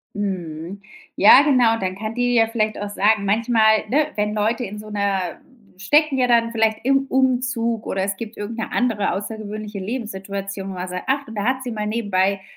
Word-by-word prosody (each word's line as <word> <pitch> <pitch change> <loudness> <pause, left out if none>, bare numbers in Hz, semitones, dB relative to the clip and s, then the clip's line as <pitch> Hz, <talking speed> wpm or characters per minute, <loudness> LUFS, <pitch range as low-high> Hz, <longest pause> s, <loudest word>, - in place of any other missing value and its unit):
Mhm. 185 -2 -4 0.3
Ja, 215 +7 +8
genau, 245 -6 +3
dann 185 -1 -2
kann 215 +3 -5
die 245 0 +1
ja 225 -1 +4
vielleicht 220 -2 -1
auch 205 0 -4
sagen, 205 +1 +2
manchmal, 220 +1 +3
ne, 295 +3 +2
wenn 210 0 -1
Leute 220 +4 0
in 205 +2 -7
so 215 0 -10
'ner 200 -4 -2 0.4
stecken 290 +9 +2
ja 250 -1 +2
dann 230 -1 +3
vielleicht 220 -1 +1
im 270 +1 +2
Umzug 250 -4 0
oder 190 - -1
es 200 0 -2
gibt 225 +1 -8
irgendeine 225 +2 -5
andere 225 -5 0
außergewöhnliche 210 0 -6
Lebenssituation, 195 -3 -5
wo - - -5
man 180 0 -5
sagt, 180 0 -5
ach, 275 +1 0
da 205 -2 -3
hat 260 +1 0
sie 250 - -4
mal 210 -1 -3
nebenbei 200 -3 0
215 Hz, 185 wpm, -21 LUFS, 200-235 Hz, 0.4 s, Ja